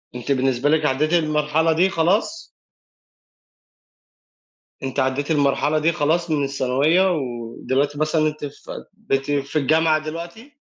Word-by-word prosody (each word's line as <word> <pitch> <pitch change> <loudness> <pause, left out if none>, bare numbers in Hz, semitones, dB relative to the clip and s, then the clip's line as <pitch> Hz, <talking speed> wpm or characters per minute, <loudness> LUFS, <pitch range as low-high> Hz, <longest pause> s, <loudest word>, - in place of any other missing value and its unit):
أنتِ 125 +3 -4
بالنسبة 135 +1 +1
لِك 155 -1 +2
عدِّيتِ 150 +4 0
المرحلة 155 0 +1
دي 180 +4 +2
خلاص؟ 200 - 0 2.4
أنتِ 135 +1 -3
عدِّيتِ 135 +4 -1
المرحلة 145 +1 +1
دي 160 +2 +2
خلاص 160 +2 0
من 145 -2 +1
الثانوية، 140 +7 +2
ودلوقتي 130 0 -2
مثلًا 155 +1 +1
أنتِ 150 -1 -4
في 145 - -9 0.2
بقيتِ 135 +1 0
في 140 +1 -2
الجامعة 155 +2 +2
دلوقتي؟ 170 - -8
150 Hz, 125 wpm, -21 LUFS, 140-160 Hz, 2.4 s, لِك